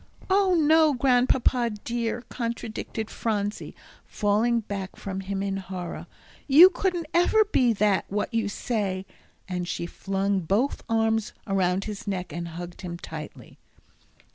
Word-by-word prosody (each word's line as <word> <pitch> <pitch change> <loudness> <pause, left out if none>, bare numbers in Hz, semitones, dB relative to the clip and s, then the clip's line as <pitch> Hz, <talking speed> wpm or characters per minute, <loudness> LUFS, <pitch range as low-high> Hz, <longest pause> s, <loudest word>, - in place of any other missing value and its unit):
"Oh, 385 -1 +4
no, 315 -2 +5
Grandpapa 250 -1 +3
dear," 235 0 -2
contradicted 230 -2 -4
Phronsie, 210 -2 -2 0.3
falling 220 +3 +1
back 200 -3 -5
from 190 -1 -5
him 195 0 -3
in 195 -1 -2
horror. 185 -2 -6 0.4
"You 325 +7 +9
couldn't 355 -2 -1
ever 425 +5 +4
be 255 - +3
that 205 -2 +2
what 205 +4 -2
you 225 -2 0
say." 200 -4 -2 0.4
And 180 -2 -3
she 170 - -3
flung 195 +2 -1
both 200 - 0
arms 225 -1 +1
around 190 -1 +1
his 210 -1 -7
neck 180 -5 -3
and 170 +1 -4
hugged 175 +1 -8
him 175 -2 -5
tightly. 160 -3 -9
210 Hz, 135 wpm, -26 LUFS, 190-245 Hz, 0.4 s, You